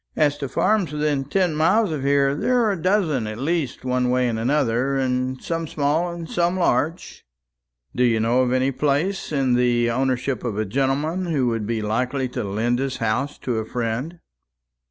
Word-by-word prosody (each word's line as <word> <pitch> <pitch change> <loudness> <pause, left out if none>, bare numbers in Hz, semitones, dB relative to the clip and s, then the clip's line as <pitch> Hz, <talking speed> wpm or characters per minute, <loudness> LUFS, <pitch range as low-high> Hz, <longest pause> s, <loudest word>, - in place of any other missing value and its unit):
As 145 -2 +2
to 140 - -4
farms 205 -3 +1
within 150 -2 -1
ten 180 +3 +1
miles 185 +6 +2
of 150 -3 -3
here, 140 0 +2
there 250 - +1
are 215 - +2
a 190 -5 -4
dozen 160 - +1
at 110 0 -5
least, 140 -2 -2
one 125 -1 +1
way 125 0 +2
and 115 -2 -2
another 135 +1 +1 0.4
some 165 -1 -3
small, 155 +4 0
and 170 -1 -7
some 175 +2 0
large." 165 +1 -1 0.7
"Do 125 - +2
you 115 -2 +3
know 115 +3 +2
of 125 -1 +1
any 130 +1 +2
place 150 +9 -1
in 135 -4 +1
the 120 -1 +2
ownership 130 +1 -1
of 115 -4 -3
a 110 - 0
gentleman 140 - -1
who 145 -6 +1
would 115 -3 -2
be 115 -2 -2
likely 125 +5 -1
to - - -4
lend 110 +5 -1
his 135 -1 -2
house 115 +6 -1
to 120 -3 -1
a - - -2
friend?" 120 +8 -3
135 Hz, 185 wpm, -22 LUFS, 120-160 Hz, 0.7 s, you